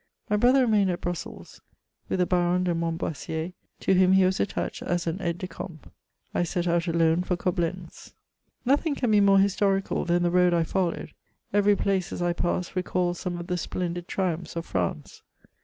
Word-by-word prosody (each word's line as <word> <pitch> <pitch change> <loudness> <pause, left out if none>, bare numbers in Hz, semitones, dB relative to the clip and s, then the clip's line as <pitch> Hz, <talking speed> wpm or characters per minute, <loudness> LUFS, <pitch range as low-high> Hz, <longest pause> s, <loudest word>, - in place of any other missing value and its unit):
My - - +4
brother 250 +5 +5
remained 210 -5 +3
at 175 - -1
Brussels 175 -1 -6 0.5
with - - 0
the 180 - +3
Baron 180 0 +1
de 180 -1 +1
Mont 165 0 -1
boissier, 160 +3 -4 0.3
to - - +2
whom 185 0 +5
he 190 -1 +5
was 185 +1 +1
attached - - -2
as 175 0 -1
an 170 +4 -3
aide 170 -2 -1
de 185 - -5
camp; 165 -2 -9 0.4
I - - +1
set 175 0 -1
out 170 0 +1
alone 165 0 +2
for 180 0 -1
C!oblentK. 175 -1 -3 0.5
Nothing 285 +4 +2
can 245 -5 0
be 210 -1 +5
more 195 -1 +5
historical 195 0 +1
than 175 0 +1
the 175 - +2
road 180 -1 +4
I 170 - +3
followed; 180 +1 -2 0.4
every 205 0 +4
place 195 -2 0
as - - -5
I 175 0 +1
passed 175 +1 -2
recalled 180 -1 0
some 180 -1 -4
of 175 - -6
the 180 0 -2
splendid 175 0 -4
triuraphs 180 -3 -2
of 165 0 -3
France. 85 -5 -3
180 Hz, 190 wpm, -26 LUFS, 170-190 Hz, 0.5 s, brother